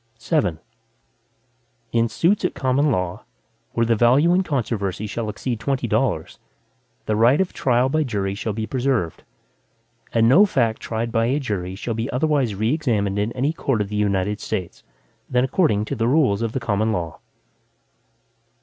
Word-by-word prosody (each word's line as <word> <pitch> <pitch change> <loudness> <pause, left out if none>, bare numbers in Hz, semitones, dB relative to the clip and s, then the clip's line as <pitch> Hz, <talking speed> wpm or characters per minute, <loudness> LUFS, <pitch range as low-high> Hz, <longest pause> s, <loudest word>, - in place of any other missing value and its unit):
VII - - 0 1.3
In 115 0 +2
suits 170 - +1
at - - -1
common 135 +3 +1
law, 90 -7 -2 0.5
where 115 - +1
the 115 0 +2
value 130 +10 +4
in 185 - +3
controversy 110 - -2
shall 110 +1 -4
exceed 115 +2 -3
twenty 135 +3 -1
dollars, - - -1 0.7
the 110 - 0
right 120 +6 +4
of 190 -1 0
trial 125 0 +2
by 155 +3 +1
jury 100 -7 -2
shall 105 +2 -3
be 110 +1 -3
preserved, 125 - -1 0.9
and 115 -1 +3
no 165 - +7
fact 120 - +1
tried 115 +1 -3
by 115 -1 +1
a 135 +4 +1
jury 95 -8 -3
shall 115 +4 -4
be 115 +4 -3
otherwise 135 -5 +1
re 110 +6 +1
examined 105 -10 0
in 105 +3 -1
any 135 +5 0
court 135 -7 -1
of 105 -1 -2
the 105 - -4
United 105 0 0
States, 90 -2 -4 0.5
than 125 0 +2
according 130 - +1
to 140 - -4
the 115 -2 0
rules 130 -7 +2
of 115 -1 -2
the - - -1
common 110 -2 0
law. 85 -6 -3
115 Hz, 170 wpm, -22 LUFS, 105-135 Hz, 1.3 s, no